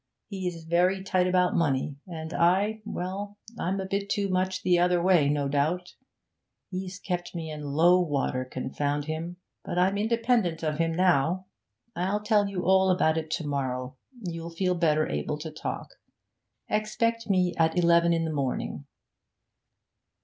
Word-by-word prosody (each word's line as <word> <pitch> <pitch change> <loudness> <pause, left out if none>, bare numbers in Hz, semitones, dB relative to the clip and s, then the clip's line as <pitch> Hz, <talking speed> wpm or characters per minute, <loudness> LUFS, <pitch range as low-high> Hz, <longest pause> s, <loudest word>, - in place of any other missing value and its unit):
He's 180 -5 -4
very 180 +3 +2
tight 185 -1 +1
about 180 -1 +3
money, 145 -3 +1
and 160 -2 -6
I 200 +6 +2
well, 200 +1 -5 0.2
I'm 190 +3 -1
a 190 - -3
bit 200 +1 -2
too 200 -2 0
much 185 0 0
the 180 -1 +4
other 180 0 +3
way, 170 -5 +4
no 145 -1 +1
doubt. 155 +6 0 0.8
He's 185 0 -5
kept 180 -2 -4
me 160 -2 -4
in 150 -1 -6
low 160 +5 +4
water, 140 -6 0
confound 145 +3 -2
him! 165 +3 -4 0.3
But - - -4
I'm 190 +3 +2
independent 225 -6 +1
of 155 -1 -1
him 165 0 +2
now. 180 +1 +2 0.5
I'll 195 +4 -1
tell 210 -2 +3
you 185 -2 -3
all 190 0 +4
about 160 -3 +3
it 155 -1 -7
to 160 0 -2
morrow, 130 -2 -2 0.3
you'll 165 -1 -5
feel 180 +2 0
better 155 -3 +2
able 150 - -2
to 155 +1 -6
talk. 155 - -5 0.8
Expect 230 +1 -1
me 180 -2 +2
at 160 +1 +3
eleven 170 -1 +4
in 165 -1 +1
the 160 - -2
morning.' 135 -3 -3
175 Hz, 155 wpm, -27 LUFS, 155-190 Hz, 0.8 s, the